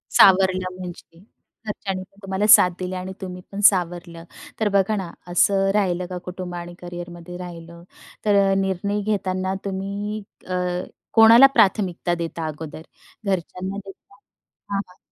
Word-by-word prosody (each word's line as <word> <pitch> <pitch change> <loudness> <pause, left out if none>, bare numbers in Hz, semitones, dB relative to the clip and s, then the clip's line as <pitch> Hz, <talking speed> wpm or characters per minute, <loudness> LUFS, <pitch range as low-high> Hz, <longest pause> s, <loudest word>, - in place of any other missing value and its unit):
सावरलं 185 -1 +5
म्हणजे. 175 -2 -9 0.5
घरच्यांनीपण 195 -2 -5
तुम्हाला 195 +2 -1
साथ 185 -4 +8
दिली 185 0 -4
आणि 185 +1 -5
तुम्हीपण 185 +1 -7
सावरलं. 175 -2 -4 0.4
तर 215 -2 +2
बघा 200 +2 +3
ना, 190 -4 -4 0.2
असं 195 +2 +3
राहिलं 185 -3 +1
का 180 - -4
कुटुंब 180 -1 -6
आणि 175 0 -7
करियरमध्ये 175 0 -8
राहिलं. 170 -1 -9 0.4
तर 200 -2 +4
निर्णय 195 +2 -1
घेताना 190 -2 -1
तुम्ही 200 +2 -4 0.3
अ, 185 - -4 0.6
कोणाला 230 +4 +9
प्राथमिकता 185 -3 +2
देता 165 -1 -4
अगोदर? 155 0 -7 0.5
घरच्यांना 190 +1 -2
देता 195 0 -12
की 205 - -46
कामाला? 195 -2 -4
185 Hz, 125 wpm, -23 LUFS, 175-195 Hz, 0.6 s, कोणाला